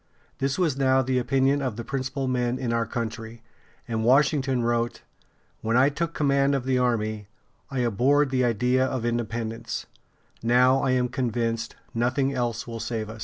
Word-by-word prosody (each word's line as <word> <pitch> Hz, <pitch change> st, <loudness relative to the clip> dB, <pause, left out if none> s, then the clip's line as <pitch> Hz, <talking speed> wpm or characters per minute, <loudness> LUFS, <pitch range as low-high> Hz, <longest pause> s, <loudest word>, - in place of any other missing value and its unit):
This 135 Hz, 0 st, 0 dB
was 170 Hz, -7 st, +1 dB
now 130 Hz, -1 st, +3 dB
the 130 Hz, 0 st, +1 dB
opinion 135 Hz, +3 st, +2 dB
of 130 Hz, -5 st, -2 dB
the 115 Hz, -, -5 dB
principal 135 Hz, +1 st, -3 dB
men 125 Hz, -1 st, 0 dB
in 120 Hz, -3 st, -2 dB
our 115 Hz, -1 st, 0 dB
country, 115 Hz, 0 st, -5 dB, 0.4 s
and 110 Hz, -1 st, -2 dB
Washington 135 Hz, 0 st, +3 dB
wrote: 120 Hz, 0 st, -1 dB, 0.6 s
"When 115 Hz, +2 st, +1 dB
I 135 Hz, +3 st, +5 dB
took 165 Hz, +3 st, -3 dB
command 140 Hz, -1 st, +2 dB
of 130 Hz, -2 st, -2 dB
the 130 Hz, -1 st, +1 dB
army, 110 Hz, -4 st, -1 dB, 0.4 s
I 135 Hz, -2 st, -2 dB
abhorred 130 Hz, +5 st, +2 dB
the 130 Hz, -1 st, +2 dB
idea 125 Hz, +2 st, +2 dB
of 130 Hz, -2 st, -2 dB
independence; 115 Hz, -1 st, -3 dB, 0.6 s
now 125 Hz, +3 st, +4 dB
I 135 Hz, -, 0 dB
am 125 Hz, -1 st, +2 dB
convinced 115 Hz, -2 st, -2 dB, 0.2 s
nothing 130 Hz, +4 st, +1 dB
else 120 Hz, -3 st, -2 dB
will 115 Hz, -1 st, -6 dB
save 110 Hz, -1 st, -3 dB
us." 110 Hz, -, -10 dB
125 Hz, 170 wpm, -25 LUFS, 115-135 Hz, 0.6 s, I